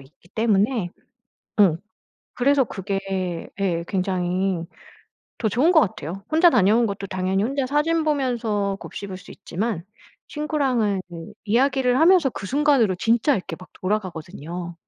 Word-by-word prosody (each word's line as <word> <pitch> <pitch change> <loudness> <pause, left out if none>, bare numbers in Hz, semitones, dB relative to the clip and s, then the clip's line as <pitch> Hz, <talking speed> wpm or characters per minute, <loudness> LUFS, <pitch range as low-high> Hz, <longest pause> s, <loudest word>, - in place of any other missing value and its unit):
있기 145 +5 -21
때문에 215 -2 +1 0.7
음 175 -6 +5 0.6
그래서 275 +2 +3
그게 195 -4 -4
예 175 -4 0
굉장히 185 -1 -1 0.7
더 220 - -1
좋은 275 - +3
것 325 - +7
같아요. 185 - -3
혼자 330 +3 +6
다녀온 230 - +4
것도 200 -1 -4
당연히 190 +1 -1
혼자 270 +3 -1
사진 300 +4 +1
보면서 235 -9 0
곱씹을 190 -2 -7
수 200 - -15
있지만 195 -2 -4 0.4
친구랑은 265 -10 0
그 165 -1 -9
이야기를 255 +3 +2
하면서 335 -4 +5
그 195 - -7
순간으로 270 -5 +3
진짜 230 +8 +2
이렇게 175 -3 -5
막 185 - -12
돌아가거든요. 175 -3 -4
205 Hz, 305 characters per minute, -23 LUFS, 185-260 Hz, 0.7 s, 것